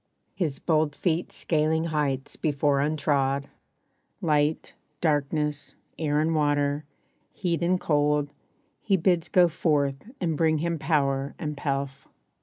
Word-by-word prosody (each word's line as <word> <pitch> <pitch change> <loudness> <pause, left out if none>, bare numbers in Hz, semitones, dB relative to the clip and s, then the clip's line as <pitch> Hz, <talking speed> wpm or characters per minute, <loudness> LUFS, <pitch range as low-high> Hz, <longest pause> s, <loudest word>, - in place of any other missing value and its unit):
His 160 -8 -2
bold 155 -3 +1
feet 170 -1 -1
scaling 160 0 +1
heights 145 -4 -1
before 145 -2 +1
untrod, 140 -2 +1 0.7
Light, 150 -1 +1 0.3
darkness, 150 -1 -1 0.2
air 150 -2 +1
and 160 +2 +1
water, 145 -1 +1 0.5
heat 175 -3 -1
and 180 +2 +2
cold 145 -2 +1 0.5
He 195 -3 +2
bids 175 -1 +1
go 180 -1 +5
forth 150 0 0
and 165 -4 0
bring 155 0 +2
him 165 +1 -1
power 140 -3 0
and 150 -2 -4
pelf. 140 -1 -3
150 Hz, 120 wpm, -26 LUFS, 145-165 Hz, 0.7 s, go